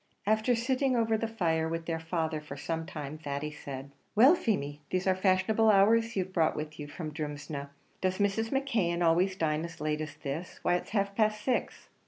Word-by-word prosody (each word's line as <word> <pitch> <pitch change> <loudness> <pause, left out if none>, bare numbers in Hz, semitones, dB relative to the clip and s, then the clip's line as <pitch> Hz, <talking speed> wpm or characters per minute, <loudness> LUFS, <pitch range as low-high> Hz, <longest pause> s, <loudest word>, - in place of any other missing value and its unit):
After 220 +4 +3
sitting 255 +2 +1
over 225 -1 +2
the 225 +1 -1
fire 165 -7 0
with 165 0 -3
their 165 -1 -2
father 160 -1 -2
for 145 -2 -8
some 160 +3 -3
time, 150 0 -6
Thady 145 0 -3
said, 140 -2 -8 0.2
"Well, 255 +9 +8
Feemy, 150 - -1
these 185 0 -1
are 190 - +4
fashionable 190 +4 +3
hours 225 +3 +4
you've 185 -1 -2
brought 165 -3 +2
with 155 0 -5
you 145 - -5
from 155 +1 -6
Drumsna. 145 -2 -5 0.3
Does 185 0 +1
Mrs. 205 +2 +1
McKeon 220 -11 +1
always 180 +3 +3
dine 155 -3 0
as 170 0 -7
late 150 0 -1
as 155 -1 -5
this? 155 +4 -5
Why 175 - +3
it's 175 - -1
half 200 -2 0
past 215 0 +1
six!" 255 +1 -1
175 Hz, 195 wpm, -30 LUFS, 155-215 Hz, 0.3 s, Well